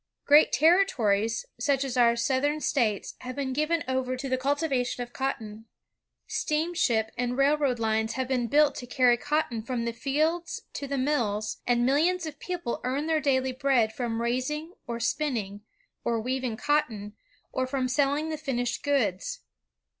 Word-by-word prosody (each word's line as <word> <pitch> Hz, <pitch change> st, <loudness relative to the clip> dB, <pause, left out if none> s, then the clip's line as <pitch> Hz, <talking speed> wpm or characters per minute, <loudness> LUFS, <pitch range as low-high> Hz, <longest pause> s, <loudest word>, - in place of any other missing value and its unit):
Great 295 Hz, +2 st, +6 dB
ter 340 Hz, +6 st, +5 dB
ritories, 225 Hz, -, 0 dB
such 275 Hz, +2 st, +1 dB
as 265 Hz, -2 st, -3 dB
our 235 Hz, -2 st, +5 dB
South 260 Hz, +3 st, 0 dB
era 295 Hz, +1 st, +1 dB
States, 230 Hz, -10 st, 0 dB
have 255 Hz, 0 st, -7 dB
been 270 Hz, -2 st, -2 dB
given 305 Hz, +4 st, 0 dB
over 260 Hz, -1 st, -1 dB
to 270 Hz, -, -4 dB
the 260 Hz, -, +2 dB
cultivation 265 Hz, -2 st, 0 dB
of 240 Hz, -, -12 dB
cotton. 225 Hz, -5 st, -4 dB, 0.6 s
Steamship 300 Hz, -9 st, 0 dB
and 245 Hz, 0 st, -1 dB
railroad 280 Hz, -2 st, +2 dB
lines 220 Hz, 0 st, 0 dB
have 260 Hz, -1 st, -2 dB
been 250 Hz, -2 st, 0 dB
built 290 Hz, +3 st, +4 dB
to 245 Hz, -, -7 dB
cany 250 Hz, -1 st, +4 dB
cotton 290 Hz, -3 st, -1 dB
from 235 Hz, 0 st, -3 dB
the 235 Hz, -, -2 dB
gelds 310 Hz, +7 st, -1 dB
to 280 Hz, -, -5 dB
the 280 Hz, 0 st, -2 dB
mills; 230 Hz, -7 st, 0 dB
and 240 Hz, -1 st, +3 dB
millions 330 Hz, +7 st, +2 dB
of 305 Hz, -2 st, -7 dB
people 350 Hz, -9 st, -4 dB
earn 265 Hz, +4 st, -1 dB
their 320 Hz, -1 st, +1 dB
daily 265 Hz, -2 st, +1 dB
bread 255 Hz, -4 st, +2 dB
from 235 Hz, -1 st, -2 dB
raising, 300 Hz, +8 st, -2 dB
or 235 Hz, -1 st, -3 dB
spinning, 225 Hz, -6 st, -2 dB, 0.4 s
or 230 Hz, -1 st, 0 dB
weaving 250 Hz, -1 st, -2 dB
cottcgi, 250 Hz, -9 st, 0 dB, 0.4 s
or 260 Hz, 0 st, -1 dB
from 260 Hz, -1 st, -1 dB
selling 285 Hz, +4 st, +1 dB
the 310 Hz, -1 st, -4 dB
finished 245 Hz, -4 st, -2 dB
goods. 235 Hz, -11 st, 0 dB
260 Hz, 165 wpm, -27 LUFS, 235-290 Hz, 0.6 s, Great